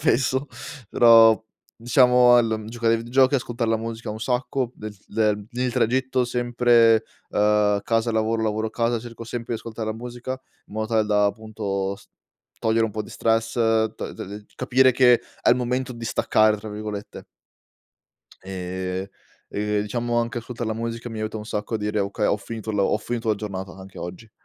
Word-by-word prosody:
spesso. 130 +2 +2 0.4
Però 115 -1 +7
al 110 - -6 0.3
diciamo 125 +1 +5 0.3
giocare 115 0 0
ai - - +4
videogiochi, 130 +4 +3
ascoltar 120 -2 -1
la 115 - +3
musica 115 +1 -6
un 110 - -5
sacco 125 +1 -1
del 105 -1 -8
del 105 -2 0
il 125 +1 -1
tragitto 130 +1 +1
sempre, 120 -2 +3 0.2
uhm, 105 -1 +2
casa 115 +1 +1
lavoro, 110 0 0
lavoro 110 0 -1
casa, 115 0 0
cerco 115 0 -9
sempre 120 0 -5
di 110 - -5
ascoltare 110 -1 -5
la - - -4
musica, 120 +2 -6 0.4
in 105 - -12
modo 110 0 -1
tale 110 -1 +2
da 105 -1 +3
appunto 100 -2 -3
s 105 - -19 0.5
togliere 115 0 +2
un 110 - -2
po' 110 +1 -3
di - - -12
stress, 115 0 0
t 110 -2 +2 0.2
t 105 +2 -9
capire 130 +1 +4
che 125 -1 +5 0.2
è - - +5
il 120 - +5
momento 125 +1 -1
di 115 -1 -8
"staccare", 110 -1 +3
tra 105 +1 -8
virgolette. 105 -1 -6 1.2
Ehm, 95 0 -4 0.5
e 105 0 0
diciamo 120 +3 -2
anche 120 +1 -1
ascoltar 120 0 -6
la 110 - -1
musica 115 +1 -4
mi 110 - -6
aiuta 110 0 -3
un 105 - -6
sacco 105 +1 -4
a - - +3
dire: 105 0 -2
"Okay, 100 +2 -1
ho - - +2
finito 110 +1 -6
la 100 -2 +1
ho - - +2
finito 115 +1 -4
la 110 - +4
giornata 95 -3 -6
anche 95 0 -12
oggi." 90 +6 -8
115 Hz, 180 wpm, -24 LUFS, 105-120 Hz, 1.2 s, Però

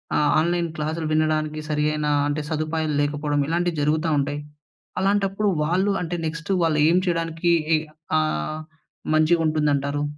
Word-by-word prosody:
ఆహ్, 150 -1 +3
ఆన్లైన్ 170 +1 +1
క్లాసులు 155 +1 -3
వినడానికి 155 0 0
సరైన 150 0 0 0.2
అంటే 150 +1 -1
సదుపాయాలు 155 -1 -1
లేకపోవడం. 145 0 -1
ఇలాంటివి 170 -1 0
జరుగుతా 155 +2 +1
ఉంటాయి. 145 +1 -1 0.6
అలాంటప్పుడు 200 +1 +1
వాళ్ళు 185 +6 +1
అంటే 175 0 -3
నెక్స్ట్ 165 +4 -5
వాళ్ళు 160 -2 +2
ఏం 175 - +4
చేయడానికి 165 0 -1 0.3
ఇ - - +2 0.4
ఆహ్, 155 - -2 0.5
మంచిగుంటుందంటారు? 155 -3 +2
155 Hz, 125 wpm, -23 LUFS, 150-170 Hz, 0.6 s, ఏం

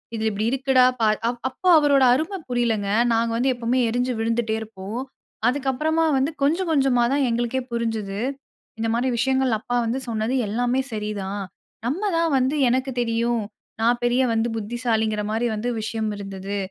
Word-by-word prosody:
இது 220 - -3
இப்படி 210 +2 -2
இருக்குடா 265 -1 +4 0.2
பார்". 215 -1 +3
அ - - +3 0.2
அப்போ 315 +8 -5
அவரோட 285 -2 +4
அருமை 320 +9 -1
புரியலைங்க. 230 -5 0 0.2
நாங்க 230 0 +1
வந்து 260 +2 +2
எப்பவுமே 240 +1 0
எரிஞ்சு 245 +2 0
விழுந்துட்டே 225 0 0
இருப்போம். 215 +1 -6 0.5
அதுக்கப்பறமா 285 +5 0
வந்து 270 +4 +1
கொஞ்சம் 335 +5 +1
கொஞ்சமா 270 -5 +3
தான் 280 -1 +2
எங்களுக்கே 240 +2 -1
புரிஞ்சது, 220 -4 -2 0.6
"இந்த 225 - 0
மாரி 255 +2 +1
விஷயங்கள் 260 -1 +2
அப்பா 245 +2 -2
வந்து 245 +4 -1
சொன்னது 220 +2 -1 0.2
எல்லாமே 245 +4 +1
சரிதான். 205 -2 -3 0.5
நம்ம 325 +11 -2
தான் 330 -1 +1
வந்து 260 +3 +1
எனக்குத் 260 0 -1
தெரியும், 235 0 0 0.4
நான் 240 +1 +2
பெரிய 245 +2 +3
வந்து 225 +1 +1
புத்திசாலிங்கிற 220 -1 -1
மாரி 225 +2 0
வந்து 225 +4 -2
விஷயம் 220 0 -2
இருந்தது. 195 0 -5
240 Hz, 155 wpm, -23 LUFS, 220-260 Hz, 0.6 s, இருக்குடா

